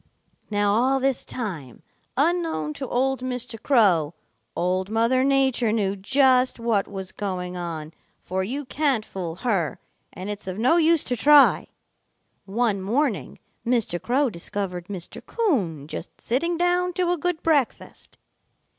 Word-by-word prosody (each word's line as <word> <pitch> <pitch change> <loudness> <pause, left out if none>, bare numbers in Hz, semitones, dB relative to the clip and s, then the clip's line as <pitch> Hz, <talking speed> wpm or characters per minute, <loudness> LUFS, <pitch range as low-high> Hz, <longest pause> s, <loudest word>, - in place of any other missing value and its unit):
"Now 205 -1 +2
all 260 +5 +2
this 265 -1 0
time, 170 - -6 0.3
unknown 320 - 0
to 265 - -6
old 265 +2 0
Mr. 250 -3 -4
Crow, 180 - +3 0.4
Old 185 +2 0
Mother 230 +4 +2
Nature 265 -4 +2
knew 200 -3 0
just 255 +4 +3
what 230 -4 +1
was 190 -2 -6
going 180 -3 -4
on, 165 -3 -5 0.3
for 190 +1 -3
you 270 +8 -3
can't 270 -5 0
fool 175 -4 -5
her, 190 - -1 0.3
and 185 +2 -7
it's 205 -1 -6
of 185 0 -4
no 255 +10 +3
use 330 -1 +4
to 250 - -2
try. 290 +4 +5 0.8
One 210 -1 0
morning 235 +3 -1 0.3
Mr. 230 -8 0
Crow 260 +1 +1
discovered 180 -1 -5
Mr. 185 -4 -7
Coon 195 - -1
just 160 - -7
sitting 335 +8 -1
down 355 +1 +1
to 355 0 0
a 355 - +1
good 355 0 -2
breakfast. 295 -7 -1
230 Hz, 140 wpm, -24 LUFS, 190-270 Hz, 0.8 s, try